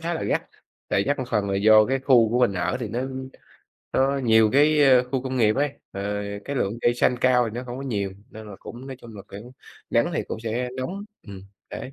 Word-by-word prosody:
khá 170 Hz, +1 st, -2 dB
là -, -, -4 dB
gắt, -, -, 0 dB, 0.5 s
tại 100 Hz, -, +2 dB
gắt 145 Hz, +6 st, -1 dB
một 130 Hz, -, -2 dB
phần 105 Hz, -3 st, 0 dB
là 95 Hz, -, 0 dB
do 110 Hz, +1 st, +6 dB
cái 135 Hz, +1 st, 0 dB
khu 125 Hz, -4 st, +4 dB
của 120 Hz, -, +1 dB
mình 120 Hz, -5 st, +3 dB
ở 90 Hz, +6 st, -1 dB
thì 115 Hz, -, -3 dB
nó 115 Hz, +4 st, -3 dB, 0.9 s
nó 135 Hz, +1 st, +2 dB
nhiều 110 Hz, -4 st, +4 dB
cái, 150 Hz, +2 st, +4 dB
ơ, 130 Hz, -2 st, +6 dB
khu 130 Hz, -1 st, 0 dB
công 130 Hz, -1 st, -4 dB
nghiệp 110 Hz, -1 st, +3 dB
ấy, 145 Hz, +1 st, +1 dB, 0.2 s
ờ, 100 Hz, -, -5 dB, 0.4 s
cái 140 Hz, -1 st, -4 dB
lượng 110 Hz, 0 st, -1 dB
cây 120 Hz, -, +2 dB
xanh 125 Hz, +1 st, +2 dB
cao 125 Hz, -2 st, +3 dB
thì 110 Hz, -, -9 dB
nó 125 Hz, -, -5 dB
không 120 Hz, 0 st, -6 dB
có -, -, -6 dB
nhiều 100 Hz, -7 st, -2 dB, 0.2 s
nên 110 Hz, 0 st, -11 dB
là 100 Hz, -, -10 dB
cũng 120 Hz, +3 st, -10 dB
nói 135 Hz, -1 st, -7 dB
chung 115 Hz, -2 st, -12 dB
là 100 Hz, -, -9 dB
kiểu 110 Hz, +5 st, -10 dB, 0.4 s
nắng -, -, +2 dB
thì -, -, 0 dB
cũng 110 Hz, -, -5 dB
sẽ 115 Hz, +2 st, -2 dB
nóng 180 Hz, +11 st, -4 dB, 0.2 s
ừm, 95 Hz, -2 st, -9 dB, 0.3 s
đấy. 135 Hz, -, -7 dB
120 Hz, 245 wpm, -24 LUFS, 110-135 Hz, 0.9 s, do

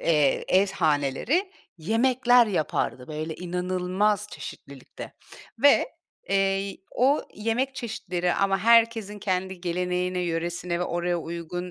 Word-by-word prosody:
eee, 150 Hz, -4 st, +2 dB
ev 190 Hz, +2 st, +4 dB
haneleri 175 Hz, -, 0 dB, 0.3 s
yemekler 245 Hz, +6 st, +3 dB
yapardı, 155 Hz, -8 st, -2 dB
böyle, 155 Hz, +1 st, -4 dB
inanılmaz 185 Hz, +4 st, -1 dB
çeşitlilikte 140 Hz, -2 st, -10 dB, 0.5 s
ve, 285 Hz, -, +5 dB, 0.4 s
eee, 195 Hz, -, +2 dB
y 195 Hz, 0 st, 0 dB
o 270 Hz, +4 st, +2 dB
yemek 230 Hz, +5 st, -1 dB
çeşitleri 185 Hz, -8 st, -2 dB
ama 195 Hz, 0 st, +1 dB
herkesin 225 Hz, -2 st, +3 dB
kendi 190 Hz, -2 st, -2 dB
geleneğine, 180 Hz, +1 st, -1 dB
yöresine 175 Hz, 0 st, -2 dB
ve -, -, +1 dB
oraya 175 Hz, 0 st, -1 dB
uygun, 170 Hz, +2 st, -5 dB
185 Hz, 115 wpm, -26 LUFS, 175-215 Hz, 0.5 s, ve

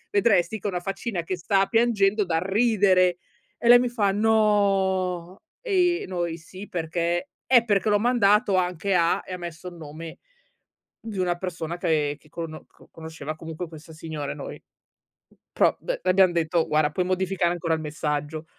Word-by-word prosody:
vedresti 205 Hz, 0 st, +2 dB
che 205 Hz, -, -4 dB
una 180 Hz, -3 st, -2 dB
faccina 195 Hz, -1 st, -3 dB
che 185 Hz, +2 st, -3 dB
sta 195 Hz, +2 st, +2 dB
piangendo 215 Hz, -3 st, +2 dB
dal 165 Hz, -2 st, 0 dB
ridere." 190 Hz, -3 st, +3 dB, 0.4 s
E 235 Hz, -, 0 dB
lei 245 Hz, 0 st, +9 dB
mi 250 Hz, -, +1 dB
fa: 210 Hz, -5 st, +1 dB
"No." 195 Hz, -4 st, +1 dB, 0.2 s
e 360 Hz, -6 st, +1 dB
i -, -, -8 dB
noi: 175 Hz, -2 st, -3 dB
"Sì, 185 Hz, +4 st, -11 dB
perché" 170 Hz, -, -2 dB, 0.2 s
"Eh, 245 Hz, -3 st, +6 dB
perché 205 Hz, -1 st, +1 dB
l'ho 205 Hz, -1 st, +3 dB
mandato 210 Hz, -3 st, +3 dB
anche 180 Hz, +2 st, 0 dB
a" 170 Hz, -1 st, +2 dB
e -, -, -10 dB
ha 180 Hz, -, -4 dB
messo 170 Hz, 0 st, -7 dB
il 175 Hz, -, -14 dB
nome 160 Hz, 0 st, -9 dB, 0.8 s
di 220 Hz, -4 st, -7 dB
una 175 Hz, -1 st, 0 dB
persona 175 Hz, -2 st, -5 dB
che 155 Hz, -4 st, 0 dB
che 150 Hz, -, -23 dB
cono 165 Hz, -1 st, -7 dB
co -, -, -22 dB
conosceva 160 Hz, -1 st, -7 dB
comunque 165 Hz, +2 st, -7 dB
questa 160 Hz, 0 st, -12 dB
signora 155 Hz, -3 st, -5 dB
e -, -, -6 dB
noi. -, -, -7 dB, 0.8 s
M -, -, -25 dB, 0.2 s
pro, -, -, +3 dB
beh, -, -, -3 dB
le -, -, +3 dB
abbiam 185 Hz, -1 st, +5 dB
detto: 165 Hz, 0 st, +1 dB
"Guarda, 150 Hz, -1 st, +2 dB
puoi 180 Hz, +3 st, 0 dB
modificare 185 Hz, -1 st, 0 dB
ancora 165 Hz, -2 st, -1 dB
il 160 Hz, -, -3 dB
messaggio." 150 Hz, 0 st, -3 dB
180 Hz, 180 wpm, -25 LUFS, 165-205 Hz, 0.8 s, lei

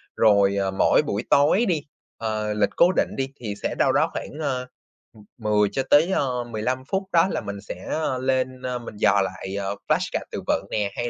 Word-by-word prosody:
Rồi, 100 Hz, -2 st, +4 dB
ờ, 95 Hz, -1 st, 0 dB
mỗi 95 Hz, -, +4 dB
buổi 120 Hz, -7 st, -3 dB
tối 150 Hz, +11 st, +4 dB
đi, 165 Hz, -8 st, 0 dB, 0.4 s
ờ, 110 Hz, -1 st, -2 dB
lịch 105 Hz, -1 st, +2 dB
cố 175 Hz, +2 st, +6 dB
định -, -, 0 dB
đi, 135 Hz, -, 0 dB
thì 105 Hz, -4 st, -4 dB
sẽ -, -, -1 dB
đâu -, -, +3 dB
đó -, -, +2 dB
khoảng, 150 Hz, -, -6 dB
ơ, 130 Hz, -3 st, -1 dB, 0.5 s
ừm, 105 Hz, -2 st, -16 dB
10 105 Hz, -2 st, +2 dB
cho 135 Hz, -, -1 dB
tới, 160 Hz, +5 st, +5 dB
ơ, 125 Hz, -7 st, 0 dB
15 120 Hz, +3 st, -3 dB
phút, 195 Hz, 0 st, 0 dB
đó 170 Hz, +1 st, +5 dB
là -, -, -2 dB
mình 100 Hz, -1 st, -6 dB
sẽ, 90 Hz, -, -8 dB
ơ, 150 Hz, -5 st, -1 dB
lên, 130 Hz, 0 st, -1 dB
ơ, 125 Hz, -1 st, -3 dB
mình 115 Hz, -3 st, -9 dB
dò 100 Hz, +1 st, +4 dB
lại, 95 Hz, +1 st, -5 dB
à, 100 Hz, -, -4 dB, 0.2 s
flash -, -, +1 dB
card -, -, -2 dB
từ -, -, -4 dB
vựng -, -, +1 dB
nè, 105 Hz, -2 st, -1 dB
hay 120 Hz, 0 st, -2 dB
120 Hz, 220 wpm, -24 LUFS, 105-135 Hz, 0.5 s, cố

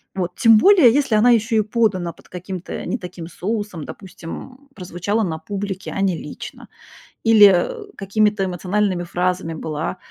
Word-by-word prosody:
вот. 180 Hz, -1 st, -3 dB
Тем 225 Hz, -1 st, +6 dB
более 355 Hz, -, +6 dB
если 275 Hz, -6 st, +1 dB
она 240 Hz, +3 st, +5 dB
ещё 225 Hz, 0 st, +2 dB
и -, -, +4 dB
подана 205 Hz, -6 st, 0 dB
под -, -, -22 dB
каким-то, 180 Hz, 0 st, -7 dB
э, -, -, -5 dB
не 245 Hz, -, -2 dB
таким 180 Hz, -2 st, -8 dB
соусом, 205 Hz, -3 st, -4 dB
допустим, 255 Hz, +9 st, -10 dB
прозвучала 190 Hz, +4 st, -2 dB
на 160 Hz, -4 st, -3 dB
публике, 195 Hz, +2 st, -5 dB
а 195 Hz, -, -2 dB
не 190 Hz, -3 st, +1 dB
лично, -, -, -9 dB, 0.6 s
или, 220 Hz, -3 st, +8 dB
э, 410 Hz, -, +1 dB
какими-то 205 Hz, 0 st, 0 dB
эмоциональными 185 Hz, 0 st, -1 dB
фразами 180 Hz, -1 st, -2 dB
была, 160 Hz, +3 st, -4 dB
195 Hz, 160 wpm, -20 LUFS, 180-220 Hz, 0.6 s, или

